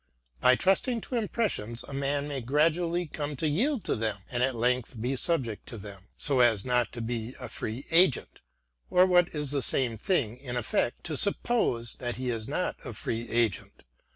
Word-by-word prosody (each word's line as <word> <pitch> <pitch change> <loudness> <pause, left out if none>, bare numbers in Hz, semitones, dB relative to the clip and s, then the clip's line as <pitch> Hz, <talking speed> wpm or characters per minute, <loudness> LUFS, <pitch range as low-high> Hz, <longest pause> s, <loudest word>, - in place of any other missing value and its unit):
By 125 - +6
trusting 220 - +1
to 250 - -5
impressions 205 - -1
a - - -8
man 140 +1 -1
may 140 -3 -3
gradually 165 +7 +1
come 150 -1 -4
to 155 +4 -1
yield 230 - +1
to - - 0
them, 110 -2 -1
and 120 -1 -1
at 130 0 +1
length 120 0 0
be 125 +4 -1
subject 130 - -1
to 115 - -7
them, 100 -2 -10
so 140 -3 +3
as 115 -5 +4
not 125 -2 +1
to 120 - -5
be 115 +1 -4
a - - -6
free 115 +6 -5
agent, 165 -4 +3 0.5
or 180 +1 +6
what 175 -2 +5
is 150 -2 -2
the 140 -1 +1
same 120 -4 0
thing 120 - 0
in 125 -2 -6
effectjto 120 +6 -1
suppose 200 - +1
that 120 -2 -4
he 125 +1 -2
is 110 -2 -4
not - - -2
a - - -6
free 115 +1 -4
agent. 115 -5 -1
130 Hz, 185 wpm, -28 LUFS, 115-165 Hz, 0.5 s, By